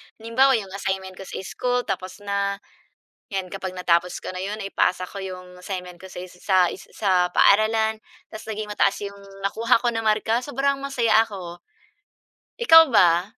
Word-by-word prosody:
Halimbawa 250 +4 +3
'yong 195 -4 -4
assignment 190 -1 -3
ko 195 - -9
sa - - -8
school 245 +4 -1
tapos 190 +1 -5
na, 200 0 -1 0.7
yan 190 -3 -4
kapag 190 -1 -5
natapos 180 0 +1
ko - - -4
na 185 - -6
yun, 200 +3 -3
naipasa 195 -3 0
ko 195 +2 -8
'yong 180 -1 -8
assignment 180 -2 -7
ko 190 - -10
sa 180 0 -8
sa 185 +1 -2 0.2
sa 185 -3 0
paaralan, 220 +1 +4 0.3
tas 220 0 -9
naging 215 0 -4
mataas 200 -1 +2
'yong 200 0 -8 0.2
nakuha 230 +5 +2
ko 240 - +2
na 225 - -2
marka, 220 +2 +1
sobrang 275 +1 -1
masaya 235 -6 +2
ako. 175 -4 -8 1.0
Ikaw 325 -8 +9
ba? 175 -3 +5
200 Hz, 160 wpm, -23 LUFS, 185-225 Hz, 1.0 s, Ikaw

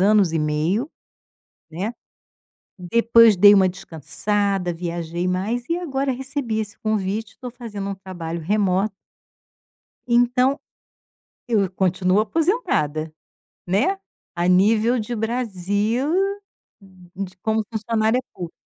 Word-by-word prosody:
anos 200 -2 +4
e 165 - +1
meio, 160 - 0 0.8
né. 190 +9 -4 0.8
Depois 230 +4 +5
dei 205 +3 +8
uma 190 -1 +5
descansada, 195 +2 -2
viajei 170 0 -3
mais 200 +7 -1
e 335 - +1
agora 275 -6 -1
recebi 260 -3 -3
esse 210 -1 -5
convite, 215 0 -2
estou 250 - -8
fazendo 215 -5 -6
um 195 - -3
trabalho 175 -3 -6
remoto 195 +3 +1 1.2
então, 250 +3 +3 0.9
eu 225 -4 +2
eu 190 - -2
continuo 185 +1 +1
aposentada, 215 - 0 0.5
né, 215 - +1 0.4
a 175 0 0
nível 215 +6 +4
de 220 +2 -4
Brasil 225 - -1 0.7
d 185 0 -9
como 220 0 0
funcionária 220 +2 +1
pública. 175 -2 -7
205 Hz, 110 wpm, -22 LUFS, 180-230 Hz, 1.2 s, dei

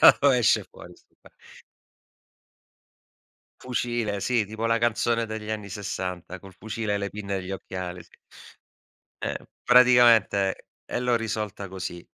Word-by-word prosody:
"Da - - +9
dove 140 -3 +5
esce 115 - +3
fuori - - -13
sto' - - -29
qua". - - -18 2.3
Fucile, 120 -5 -2
sì, 120 -2 +1
tipo 110 +2 -4
la 115 - +3
canzone 115 0 +1
degli 110 -1 -6
anni 105 -2 -4
60', 90 -2 -5
col 95 -1 -13
fucile 110 +1 -4
e - - 0
le 100 0 -2
pinne 100 -1 -4
e 95 - -4
gli 90 - -7
occhiali, 90 -2 -6
sì. 85 - -25 1.1
Eh, - - -1 0.3
praticamente, 120 -6 +5 0.2
e - - -3
l'ho 125 -1 +2
risolta 105 -3 -4
così. 90 -2 -6
105 Hz, 145 wpm, -26 LUFS, 95-115 Hz, 2.3 s, Da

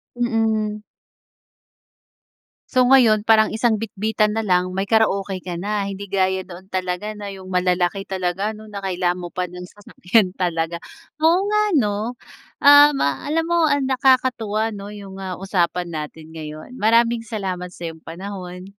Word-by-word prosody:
Mm. 220 -3 0 1.9
So, 255 -1 +3
ngayon 245 -5 +5
parang 220 -1 +5
isang 225 -1 +1
bitbitan 215 0 -1
nalang 185 -4 +1
may 195 - 0
karaoke 200 -2 +1
ka 180 -1 -6
na? 200 +3 -2
Hindi 200 0 -6
gaya 190 -1 +1
noon 185 +1 -12
talaga 185 +3 -3
na 205 -1 -7
yung 190 -1 -10
malalaki 180 +1 0
talaga 190 +1 -2
no? 215 0 -11
Na 200 -1 -8
kailangan 180 -1 -1
mo 175 - -6
pa 180 0 -2
ng 180 +1 -9
sasakyan 190 0 0
talaga, 170 -2 -1 0.4
oo 335 +6 +3
nga 425 0 +2 0.2
no. 215 +2 -2 0.4
Um, 290 -1 +7
alam 295 - 0
mo 340 -1 +2
ang 285 -2 +1
nakakatuwa 250 -5 +1
no 200 0 -8
yung, 200 -2 -10
ah, 190 -2 -6
usapan 180 -2 0
natin 155 +1 -7
ngayon, 155 +8 -8
maraming 230 +1 +3
salamat 190 -6 -4
sa 170 -1 -7
iyong 160 -1 -10
panahon. 180 +1 -8
200 Hz, 145 wpm, -21 LUFS, 180-225 Hz, 1.9 s, Um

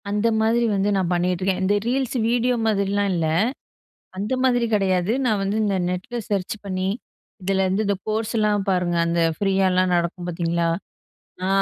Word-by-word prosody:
அந்த 210 +2 +1
மாதிரி 230 +2 +2
வந்து 195 +1 +1
நான் 185 -3 0
பண்ணிகிட்டுருக்கேன். 180 +2 0
இந்த 195 +2 +2
ரீல்ஸ் 260 +1 0
வீடியோ 245 +1 +2
மாதிரிலாம் 200 -1 +1
இல்ல, 165 -2 0 0.9
அந்த 205 +6 -1
மாதிரி 245 -2 +3
கிடையாது. 190 -1 +1
நான் 215 -4 +1
வந்து 195 +2 -1
இந்த 200 -2 +1
நெட்ல 180 +7 -4
சர்ச் 195 -2 -1
பண்ணி, 185 -1 -2 0.5
இதலருந்து 190 +2 +1
இந்த 200 0 +1
கோர்ஸ்லாம் 215 -2 0
பாருங்க, 180 -2 +1
அந்த 170 0 +1 0.2
ஃப்ரீயாலாம் 190 -2 +2
நடக்கும் 175 +1 -1
பாத்தீங்களா? 170 -1 0 0.8
ஆ - - 0
195 Hz, 145 wpm, -23 LUFS, 180-215 Hz, 0.9 s, மாதிரி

